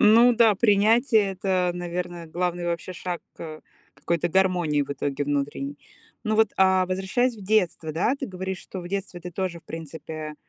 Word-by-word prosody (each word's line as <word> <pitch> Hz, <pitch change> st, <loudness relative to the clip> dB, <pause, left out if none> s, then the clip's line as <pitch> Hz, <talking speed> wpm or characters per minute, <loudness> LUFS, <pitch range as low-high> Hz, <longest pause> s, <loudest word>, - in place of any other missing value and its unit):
Ну 230 Hz, +3 st, +7 dB
да, 225 Hz, -2 st, +5 dB
принятие- 215 Hz, 0 st, +4 dB
это, 185 Hz, -1 st, +1 dB
наверное, 175 Hz, -1 st, -4 dB
главный 175 Hz, +1 st, -2 dB
вообще 170 Hz, +2 st, -3 dB
шаг 175 Hz, 0 st, -5 dB
к 155 Hz, -2 st, -8 dB, 0.3 s
какой-то 170 Hz, 0 st, -1 dB
гармонии 175 Hz, -5 st, +2 dB
в 140 Hz, -, -7 dB
итоге 140 Hz, 0 st, -2 dB
внутренней. 145 Hz, 0 st, -2 dB, 0.5 s
Ну 215 Hz, -1 st, +1 dB
вот, 220 Hz, 0 st, +4 dB
а, 190 Hz, -1 st, +4 dB
возвращаясь 195 Hz, +7 st, 0 dB
в 205 Hz, -, -11 dB
детство, 185 Hz, -6 st, +1 dB
да, 180 Hz, -, +1 dB
ты 270 Hz, -, -3 dB
говоришь, 190 Hz, 0 st, -4 dB
что 190 Hz, -, -8 dB
в 175 Hz, -, -8 dB
детстве 190 Hz, -2 st, -4 dB
ты 180 Hz, -, -7 dB
тоже, 175 Hz, -1 st, -3 dB
в -, -, -45 dB
принципе, 155 Hz, -1 st, -7 dB
180 Hz, 170 wpm, -25 LUFS, 165-200 Hz, 0.5 s, Ну